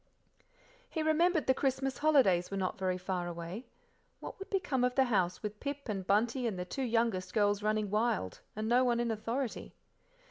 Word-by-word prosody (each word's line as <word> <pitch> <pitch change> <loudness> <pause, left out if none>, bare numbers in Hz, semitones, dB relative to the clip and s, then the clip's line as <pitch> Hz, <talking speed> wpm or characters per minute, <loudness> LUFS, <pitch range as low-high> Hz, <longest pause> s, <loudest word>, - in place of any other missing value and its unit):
He 320 - -2
remembered 315 +1 +3
the 260 - +4
Christmas 265 -1 -1
holidays 255 - +4
were 195 - -3
not 185 -1 -2
very 185 -1 0
far 180 -1 -3
away; 170 +7 -6 0.5
what - - -8
would 390 - -8
become 330 -10 0
of 250 0 +1
the 265 - +5
house 185 -8 0
with 210 0 -5
Pip 280 0 -5
and 195 -3 -3
Bunty 235 +5 +2
and 205 -5 -3
the 180 - -3
two 270 - -5
youngest 230 -6 0
girls 205 -1 +2
running 215 -1 0
wild, 215 - 0 0.2
and 215 +1 -3
no 245 +2 +4
one 240 -2 +2
in 235 -1 0
authority? 230 +3 -3
225 Hz, 185 wpm, -32 LUFS, 195-265 Hz, 0.5 s, the